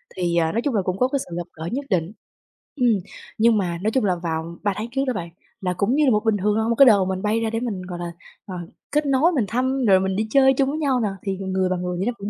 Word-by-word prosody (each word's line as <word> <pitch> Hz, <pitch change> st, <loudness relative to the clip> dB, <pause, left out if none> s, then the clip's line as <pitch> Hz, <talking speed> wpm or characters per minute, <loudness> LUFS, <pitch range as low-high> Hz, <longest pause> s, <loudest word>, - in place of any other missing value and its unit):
Thì, 175 Hz, -2 st, -1 dB
à, 160 Hz, -1 st, +2 dB
nói 230 Hz, -, 0 dB
chung 275 Hz, -3 st, -1 dB
là 200 Hz, -, +3 dB
cũng 185 Hz, 0 st, -2 dB
có 255 Hz, -, +3 dB
cái 280 Hz, +1 st, -1 dB
sự 175 Hz, -9 st, -7 dB
gặp 175 Hz, -, -4 dB
gỡ 160 Hz, +1 st, -7 dB
nhất 275 Hz, +3 st, -3 dB
định 180 Hz, -1 st, 0 dB, 0.6 s
ừm, 250 Hz, -4 st, +2 dB, 0.5 s
nhưng 225 Hz, 0 st, +4 dB
mà, 175 Hz, -3 st, -1 dB
nói 215 Hz, -, +1 dB
chung 255 Hz, -4 st, +1 dB
là 180 Hz, -2 st, +2 dB
vào 165 Hz, 0 st, -4 dB
3 205 Hz, -1 st, +1 dB
tháng 215 Hz, +4 st, -4 dB
trước 270 Hz, +1 st, 0 dB
đó 255 Hz, -, +1 dB
bạn 170 Hz, -4 st, -5 dB, 0.3 s
là 180 Hz, -1 st, -1 dB
cũng 205 Hz, +8 st, 0 dB
như 300 Hz, 0 st, +3 dB
là 260 Hz, -, +4 dB
một 210 Hz, +1 st, +1 dB
bình 220 Hz, -2 st, +3 dB
thường 205 Hz, +2 st, +1 dB
thôi, 220 Hz, +1 st, 0 dB
một 235 Hz, -, +2 dB
cái 275 Hz, -, +8 dB
đợt 200 Hz, -6 st, +5 dB
mình 190 Hz, 0 st, -2 dB
bay 215 Hz, +2 st, +1 dB
ra 225 Hz, -, 0 dB
để 225 Hz, 0 st, -2 dB
mình, 220 Hz, -7 st, -3 dB
gọi 180 Hz, -1 st, -7 dB
là, 175 Hz, -1 st, -4 dB, 0.3 s
ờ, 185 Hz, -, -7 dB, 0.4 s
kết 300 Hz, 0 st, +1 dB
nối 280 Hz, +6 st, +3 dB
mình 255 Hz, -10 st, +1 dB
thăm 260 Hz, +4 st, 0 dB
rồi 190 Hz, -2 st, +6 dB
mình 190 Hz, 0 st, -1 dB
đi 215 Hz, +2 st, -1 dB
chơi 265 Hz, +1 st, +5 dB
chung 270 Hz, +1 st, +1 dB
với 305 Hz, +3 st, -3 dB
nhau 270 Hz, -4 st, +1 dB
nè 215 Hz, -3 st, 0 dB
thì 195 Hz, -2 st, -2 dB
người 190 Hz, -1 st, -1 dB
và 185 Hz, -, 0 dB
người 180 Hz, 0 st, -3 dB
vậy 190 Hz, -, -1 dB
nó 245 Hz, -, 0 dB
cũng 200 Hz, +1 st, -5 dB
210 Hz, 310 wpm, -22 LUFS, 185-250 Hz, 0.6 s, cái